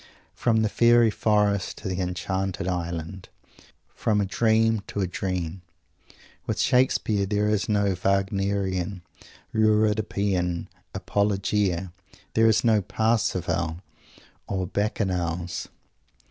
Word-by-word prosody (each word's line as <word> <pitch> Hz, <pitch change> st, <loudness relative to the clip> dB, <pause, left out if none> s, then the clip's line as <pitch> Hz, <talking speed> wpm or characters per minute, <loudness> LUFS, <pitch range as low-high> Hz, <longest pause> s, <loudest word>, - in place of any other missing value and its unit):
From 110 Hz, -2 st, +1 dB
the -, -, +2 dB
fairy 120 Hz, +1 st, +4 dB
forest 105 Hz, -3 st, +1 dB
to -, -, -6 dB
the 95 Hz, 0 st, -2 dB
enchanted 95 Hz, +1 st, -2 dB
island; 85 Hz, 0 st, -4 dB, 0.6 s
from 105 Hz, -2 st, 0 dB
a 100 Hz, -, +1 dB
dream 110 Hz, +2 st, +2 dB
to 100 Hz, -, -3 dB
a -, -, +1 dB
dream. 90 Hz, -1 st, -3 dB, 0.9 s
With -, -, -2 dB
Shakespeare 120 Hz, -6 st, +2 dB
there 105 Hz, +1 st, +1 dB
is 105 Hz, -3 st, 0 dB
no 100 Hz, -2 st, +2 dB
Wagnerian, 95 Hz, -1 st, 0 dB, 0.5 s
Euripidean 105 Hz, -5 st, +1 dB, 0.3 s
"apologia." 100 Hz, -3 st, 0 dB, 0.4 s
There 115 Hz, 0 st, +4 dB
is 110 Hz, -1 st, +3 dB
no 110 Hz, -3 st, +4 dB
"Parsifal" 90 Hz, -6 st, 0 dB, 0.7 s
or 95 Hz, -2 st, -2 dB
"Bacchanals." 90 Hz, -4 st, -2 dB
100 Hz, 105 wpm, -25 LUFS, 90-105 Hz, 0.9 s, fairy